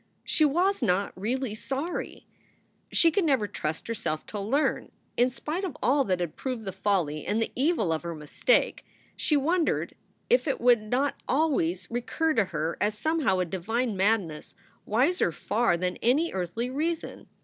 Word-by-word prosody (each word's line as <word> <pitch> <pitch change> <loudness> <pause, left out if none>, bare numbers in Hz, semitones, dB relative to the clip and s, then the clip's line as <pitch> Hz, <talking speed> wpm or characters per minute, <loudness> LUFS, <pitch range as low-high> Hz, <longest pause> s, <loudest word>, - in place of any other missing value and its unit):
She 310 - +3
was 355 +7 +2
not 200 -3 +1
really 240 +4 -2
sorry! 270 +9 -4 0.7
She 330 - +4
could 390 +4 +1
never 265 -9 +2
trust 155 -4 -4
herself 215 -9 -3
to 210 - -6
learn. 255 +10 0 0.2
In 245 +1 +4
spite 305 +8 -4
of 360 -8 -4
all 275 +2 +4
that 185 -4 0
had 175 -3 -3
proved 250 -5 -4
the 190 - -3
folly 180 -6 0
and 210 - 0
the 225 - -1
evil 265 - +2
of 160 - -2
her 170 -1 -5
mistake, 150 - +1 0.3
she 300 - +2
wondered 330 +4 +1 0.3
if 485 -6 +3
it 275 - 0
would 240 -2 +5
not 250 +7 -1
always 245 - +1
recur 310 +7 0
to 225 -6 +3
her 160 -2 -3
as 210 0 +1
somehow 300 - +1
a 180 - +1
divine 215 +7 -2
madness 190 -6 0 0.3
wiser 255 - +2
far 175 - +1
than 180 +1 -2
any 290 +8 +2
earthly 190 +7 -2
reason. 320 +4 -3
230 Hz, 165 wpm, -27 LUFS, 185-290 Hz, 0.7 s, would